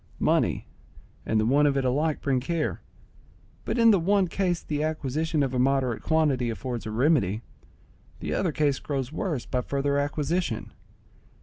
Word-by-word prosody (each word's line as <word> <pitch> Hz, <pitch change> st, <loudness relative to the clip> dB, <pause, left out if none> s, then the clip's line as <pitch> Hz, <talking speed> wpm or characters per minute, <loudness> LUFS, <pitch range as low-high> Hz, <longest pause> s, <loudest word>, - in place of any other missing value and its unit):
Money -, -, +1 dB, 0.6 s
and 110 Hz, -, +2 dB
the 110 Hz, -, +2 dB
want 145 Hz, +5 st, +4 dB
of 140 Hz, -1 st, +1 dB
it 135 Hz, -, 0 dB
alike 150 Hz, +5 st, 0 dB
bring 135 Hz, -2 st, +1 dB
care; 160 Hz, +5 st, -2 dB, 0.8 s
but -, -, -1 dB
in 230 Hz, -1 st, +6 dB
the 200 Hz, -, +4 dB
one 195 Hz, +2 st, +2 dB
case 175 Hz, -1 st, -1 dB
the 150 Hz, -1 st, -2 dB
acquisition 155 Hz, 0 st, -1 dB
of 135 Hz, -1 st, -2 dB
a 125 Hz, -, 0 dB
moderate 130 Hz, -2 st, +1 dB
quantity 145 Hz, -6 st, +1 dB
affords 120 Hz, 0 st, -4 dB
a -, -, -4 dB
remedy; 115 Hz, -, +2 dB, 0.8 s
the -, -, -3 dB
other 180 Hz, -, 0 dB
case 145 Hz, -2 st, +1 dB
grows 135 Hz, -3 st, -3 dB
worse 160 Hz, -, -3 dB
by 125 Hz, -, -1 dB
further 140 Hz, +2 st, 0 dB
acquisition. 145 Hz, -2 st, -2 dB
145 Hz, 165 wpm, -26 LUFS, 130-160 Hz, 0.8 s, in